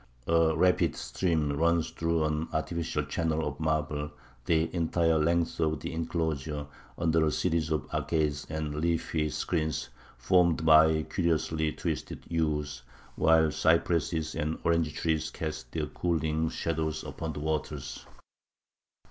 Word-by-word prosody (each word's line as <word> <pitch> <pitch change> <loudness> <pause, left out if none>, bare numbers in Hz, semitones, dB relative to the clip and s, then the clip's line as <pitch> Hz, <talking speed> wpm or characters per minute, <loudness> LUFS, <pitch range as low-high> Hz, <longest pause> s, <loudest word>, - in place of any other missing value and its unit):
A 80 -1 +3
rapid 90 +2 +3
stream 80 -5 0
runs 85 +1 +2
through 85 -1 0
an 75 +1 -1
artificial 80 0 -1
channel 80 +2 -1
of 75 -1 -5
marble 75 -1 -1 0.4
the 80 -1 +3
entire 80 -1 +2
length 85 +2 +1
of 80 -2 +1
the - - -5
enclosure 80 -3 -2 0.3
under 80 -1 +2
a 75 - +2
series 80 0 0
of 80 -2 -1
arcades 75 -3 0
and 75 -1 -3
leafy 80 0 0
screens 80 +1 -2 0.3
formed 85 +4 +3
by 80 0 +6
curiously 80 -2 0
twisted - - -4
yews, 75 -5 -1 0.3
while 80 -1 +4
cypresses 80 0 +1
and 75 +2 -2
orange 85 -2 +2
trees 80 -2 0
cast 80 -1 -5
their - - -1
cooling 80 -2 -1
shadows 80 -1 -2
upon 80 -1 -5
the - - -6
waters. 75 -2 -3
80 Hz, 130 wpm, -29 LUFS, 75-85 Hz, 0.4 s, by